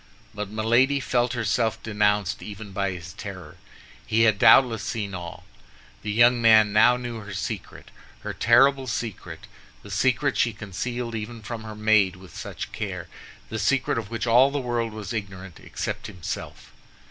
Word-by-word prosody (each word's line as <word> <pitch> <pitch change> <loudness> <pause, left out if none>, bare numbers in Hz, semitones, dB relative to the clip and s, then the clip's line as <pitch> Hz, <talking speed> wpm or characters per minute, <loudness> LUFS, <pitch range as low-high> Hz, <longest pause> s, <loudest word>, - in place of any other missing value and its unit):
But 105 -1 -5
Milady 120 +6 +2
felt 125 -2 0
herself 115 -1 -1
denounced 105 -1 0
even 105 0 -8
by 100 0 -1
his 85 -3 -7
terror. - - -9 0.5
He 110 +1 +1
had 110 -3 +3
doubtless 120 -5 +6
seen 105 -3 -4
all. 90 -2 -7 0.6
The 105 - -4
young 120 +2 +4
man 110 -2 +6
now 120 +3 +5
knew 120 -2 -6
her 105 -2 -9
secret, - - -6 0.3
her - - -5
terrible 135 +3 +4
secret—the 105 - -7
secret - - +1
she 115 - +2
concealed 115 +4 -5
even 110 +1 -6
from 110 +1 -6
her 110 -1 -7
maid 105 -3 +3
with 95 0 -15
such - - -6
care, - - -5 0.4
the 110 - -4
secret 125 +2 +1
of 105 -3 -7
which 115 0 -3
all 120 +3 +5
the 145 - -3
world 120 -3 -2
was 110 +1 -6
ignorant, 95 -4 -6
except - - -5
himself. 90 -6 -7
110 Hz, 160 wpm, -25 LUFS, 105-120 Hz, 0.6 s, doubtless